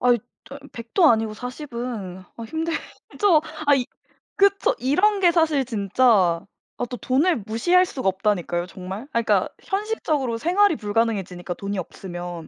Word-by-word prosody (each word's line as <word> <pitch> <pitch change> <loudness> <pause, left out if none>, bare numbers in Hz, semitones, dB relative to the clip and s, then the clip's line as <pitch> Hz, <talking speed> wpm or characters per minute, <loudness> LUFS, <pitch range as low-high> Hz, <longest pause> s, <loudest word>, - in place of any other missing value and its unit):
아잇. 245 -2 +3 0.3
아 275 - -8 0.2
100 230 -1 -9
도 345 -6 +6
아니고 220 -1 +1
40 250 +3 -8
은 210 -7 -5 0.2
아 230 - -7
힘들죠. 325 - 0 0.3
아이 275 -4 +4 0.5
그쵸. 400 0 +3
이런 370 - +2
게 350 -2 +5
사실 315 -5 +2
진짜 200 -5 +2 0.4
아 - - -1
또 250 - -4
돈을 275 - +1
무시할 350 +12 +3
수가 260 - -4
없다니까요 185 -3 -1
정말. 190 +3 -7
아 235 - +2
그러니까 230 - +2
현실적으로 320 - -1
생활이 360 - +3
불가능해지니까 205 -5 -1
돈이 200 0 -4
없으면 175 -2 -7
240 Hz, 310 characters per minute, -23 LUFS, 200-320 Hz, 0.5 s, 도